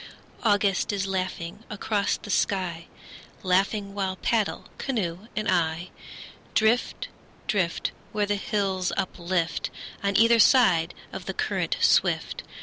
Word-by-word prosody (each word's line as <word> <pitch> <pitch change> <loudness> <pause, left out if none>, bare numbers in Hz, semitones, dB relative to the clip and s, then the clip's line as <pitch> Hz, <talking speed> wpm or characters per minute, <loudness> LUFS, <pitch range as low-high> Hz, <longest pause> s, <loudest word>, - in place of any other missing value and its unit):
August 205 -3 +2
is 195 -1 -1
laughing 185 0 -3
across 210 -1 0
the 205 - -7
sky, 180 -5 0 0.6
Laughing 195 +2 +1
while 190 -2 -1
paddle, 215 +1 0
canoe 205 -6 -2
and 215 0 -1
I, 170 -1 0 0.6
Drift, 225 +3 +2 0.4
drift, 185 -6 0 0.2
Where 210 -1 +1
the 205 - 0
hills 195 -2 -1
uplift 180 -2 -1 0.3
On 200 -1 +1
either 230 +1 +6
side 200 -10 +5 0.2
of - - -7
the - - -3
current - - -1
swift. - - +2
195 Hz, 120 wpm, -26 LUFS, 180-210 Hz, 0.6 s, either